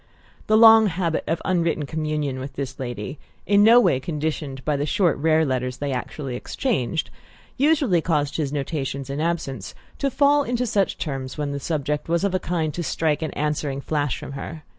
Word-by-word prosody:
The 215 - +4
long 225 -1 +8
habit 170 -3 -1
of 165 +1 -1
unwritten 170 -5 +1
communion 150 -3 -2
with 135 +1 -6
this 130 -1 -5
lady 120 +2 -5 0.3
in 200 +1 +4
no 230 +3 +8
way 180 - +3
conditioned 150 -2 -4
by 150 - +1
the 145 +1 -1
short 175 -1 +2
rare 160 +1 +3
letters 125 -2 -2
they 145 -1 -3
actually 130 +1 -4
exchanged 160 - -2 0.4
usually 275 - +3
caused 150 -4 0
his 145 -4 -1
notations, 140 -2 -3
in 140 +2 -3
absence, 155 - -3 0.2
to 280 - +1
fall 285 +2 +4
into 250 -2 -1
such 200 -4 0
terms 135 -3 -4
when 145 -1 -2
the 140 - -3
subject 150 0 -2
was 170 +2 +1
of 200 -2 +1
a 185 - +1
kind 165 -4 -2
to 175 - -3
strike 160 -2 0
an 160 - -2
answering 150 -2 -2
flash 145 -1 -1
from - - -8
her. 150 +3 -7
155 Hz, 185 wpm, -23 LUFS, 140-175 Hz, 0.4 s, long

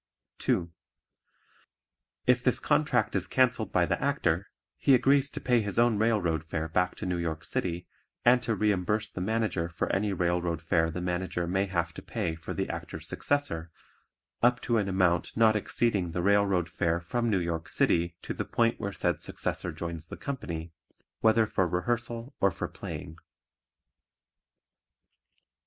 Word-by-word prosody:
(2) 85 -1 0 1.5
If - - +3
this - - +3
contract - - +1
is - - 0
cancelled - - +2
by - - +3
the - - -1
Actor, - - 0 0.3
he 135 - +5
agrees 135 +2 +4
to - - -5
pay 120 -2 +2
his 100 -2 -3
own 120 -3 +4
railroad 100 -8 +1
fare 80 0 -3
back 90 +3 0
to - - -6
New 90 -1 -1
York 80 -1 -3
City 90 -1 -2 0.4
and 125 +1 +6
to 115 -2 -1
reimburse 105 +1 0
the 90 - -5
Manager 110 -4 0
for 85 - -2
any 100 +2 +1
railroad 85 -2 0
fare 80 -1 +1
the 90 +2 -4
Manager 90 0 -2
may 95 +3 0
have 85 -3 -1
to - - -8
pay 105 -8 -2
for 80 -1 -8
the - - -1
Actor's - - -6
successor 145 - -1 0.7
up 125 +1 +4
to 115 -2 +1
an 100 -2 -1
amount 90 -1 +1
not 110 -1 +5
exceeding 105 -3 0
the 90 - -1
railroad 100 -3 +3
fare 85 0 0
from 120 +8 -1
New 100 - +2
York 85 -2 -3
City 85 0 +1
to - - -3
the - - -3
point 115 0 +1
where 100 - -3
said - - -1
successor 90 - -3
joins 85 0 -6
the - - -8
company, 85 - -5 0.5
whether 110 0 +4
for 95 -3 +1
rehearsal 115 - -2
or 100 - +4
for 85 - -4
playing. 80 +1 -8
95 Hz, 160 wpm, -29 LUFS, 85-110 Hz, 1.5 s, and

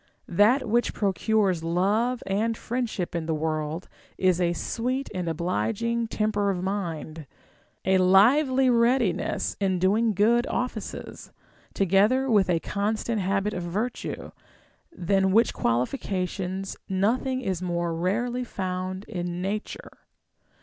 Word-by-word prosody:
That 225 +8 +4
which 235 +3 +1
procures 195 -3 +1
love 205 +9 +1
and 215 +4 0
friendship 235 -8 -3
in 165 -2 -3
the 160 - 0
world 155 +2 -2 0.3
is 185 -1 +2
a 175 -1 +2
sweet 255 +9 -2
and 180 -3 -2
obliging 225 +8 -1
temper 210 -2 0
of 180 -2 -2
mind, 165 -6 -4 0.6
a 190 0 +4
lively 255 +9 +5
readiness 235 -4 +1
in 190 -2 +1
doing 210 +5 +2
good 230 +5 +3
offices, 240 -4 -5 0.4
together 210 +8 +3
with 200 -4 +4
a 170 -2 +2
constant 215 +2 -1
habit 195 +2 0
of 180 - -3
virtue; 205 +8 -4 0.6
than 195 - +1
w^hich 225 +4 +3
qualifications 185 - -2
nothing 245 +7 0
is 190 -7 -2
more 175 -2 -1
rarely 235 +9 -1
found 185 -3 -4
in 175 -4 -4
nature. 200 +3 -4
195 Hz, 120 wpm, -26 LUFS, 180-230 Hz, 0.6 s, lively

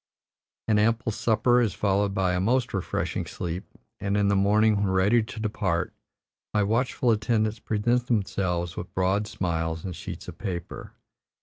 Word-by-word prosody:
An 110 -2 +3
ample 115 +2 +2
supper 120 +3 +3
is 110 -5 0
followed 100 0 +1
by 95 -1 +1
a 90 - +1
most 120 +7 +1
refreshing 95 -3 -2
sleep, 85 +2 -4 0.3
and 100 0 0
in 100 -1 +3
the 100 - +3
morning, 105 +2 +4
when 100 0 +1
ready 95 +5 +4
to 110 0 -7
depart, 95 -5 -1 0.6
my 105 - +4
watchful 120 +3 +1
attendants 110 0 +1
present 120 +4 0
themselves 90 -6 -1
with - - -7
broad 95 +3 +1
smiles 80 -3 -2
and 90 -3 -4
sheets - - -7
of - - -9
paper. 85 -3 -5
105 Hz, 155 wpm, -26 LUFS, 95-110 Hz, 0.6 s, morning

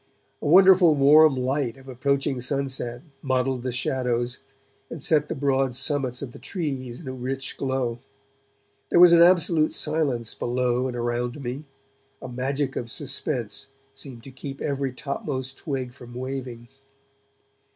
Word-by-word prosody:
A - - -3
wonderful 185 -1 +7
warm 150 +1 +6
light 130 -1 -1
of 135 0 -16
approaching 135 +1 -1
sunset 130 -2 -2 0.2
modelled 130 -1 0
the 130 0 -3
shadows 125 0 -1 0.5
and 165 - -7
set 150 +1 +2
the - - -2
broad 135 -2 +1
summits 130 -2 +2
of 130 - -6
the - - -12
trees 135 -9 -4
in 160 - -11
a 130 - -4
rich 130 +1 -4
glow. 130 -3 -2 0.9
There - - +4
was 175 -1 +9
an 170 - +7
absolute 170 -3 +4
silence 145 -7 0
below 125 +1 0
and 125 - -5
around 120 +3 -2
me; 130 +5 -5 0.5
a - - -8
magic 135 +2 -2
of 120 - -4
suspense 120 -2 -3 0.3
seemed 130 -4 -9
to 135 - -10
keep 135 +1 -8
every 140 -2 -2
topmost 130 0 -4
twig 130 -5 -4
from 120 -2 -12
waving. 125 -2 -6
130 Hz, 145 wpm, -25 LUFS, 125-145 Hz, 0.9 s, was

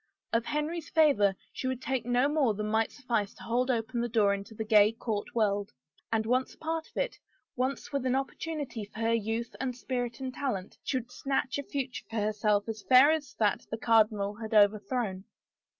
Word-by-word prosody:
Of 230 0 +2
Henry's 300 +4 -2
favor 230 -12 +4 0.2
she 260 - -3
would 260 -1 -2
take 260 -2 -2
no 245 +2 +3
more 285 -7 +2
than 210 +1 -3
might 220 0 +2
suffice 230 -7 -2
to - - -13
hold 245 +3 0
open 235 -1 0
the 240 - -1
door 210 -3 +3
into 200 +2 -6
the 220 - -3
gay 215 0 +5
court 225 -3 -4
world, 205 -3 +1 0.4
and, 220 -1 +1
once 255 +3 0
a - - -34
part 320 0 -3
of - - -16
it, - - -1 0.4
once 260 +3 -2
with 280 -2 -1
an 255 - +2
opportunity 275 -3 -3
for 210 +2 -11
her 225 0 +2
youth 225 +1 -2
and 255 -2 -2
spirit 245 -2 -3
and 260 -1 -4
talent, 225 -10 -3
she 260 - 0
would 245 -1 -6
snatch 270 +1 -1
a - - -3
future 270 -2 -4
for 225 - -7
herself 210 -1 +1
as 220 -1 -4
fair 260 +6 +7
as 315 -2 -2
that 210 -3 +1
the 225 - -3
cardinal 215 -3 +3
had 220 +1 -5
overthrown 205 -1 +2
235 Hz, 200 wpm, -30 LUFS, 215-260 Hz, 0.4 s, fair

